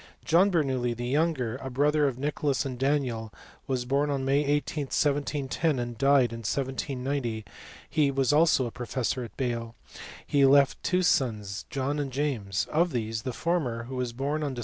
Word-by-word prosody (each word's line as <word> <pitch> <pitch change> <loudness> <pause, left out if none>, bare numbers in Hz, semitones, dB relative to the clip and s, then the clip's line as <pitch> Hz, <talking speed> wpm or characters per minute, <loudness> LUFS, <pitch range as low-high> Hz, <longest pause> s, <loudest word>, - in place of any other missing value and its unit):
John 175 +5 +5
Bernoulli, 130 -9 0
the 120 - -4
younger, 135 -4 0
a 135 - -6
brother 145 +3 +2
of 130 -3 -3
Nicholas 145 0 -1
and 130 -3 -5
Daniel, 130 -6 0 0.4
was 130 -2 -1
born 140 +3 +1
on 135 -2 -1
May 140 +2 +3
18, 145 +1 -1
1710, 145 +1 0
and 120 -1 -3
died 135 -1 +3
in 115 - -6
1790; 130 -1 -2 0.4
he 150 -3 +2
also 135 - -5 0.2
was 165 -3 +4
a 120 -2 -2
professor 125 +1 -2
at 115 - -10
Bale. 120 -3 -3 0.5
He 140 -1 +2
left 140 0 +5
two 185 0 +1
sons, 110 - 0
John 140 +2 -2
and 140 -2 -2
James: 125 -9 -1
of 170 +1 +2
these, 110 -2 -2
the 130 - -3
former, 130 -7 -1
who 130 +3 -7
was 125 -2 -2
born 140 +5 -2
on 140 -3 -2
Dec. - - -6
135 Hz, 175 wpm, -27 LUFS, 120-145 Hz, 0.5 s, John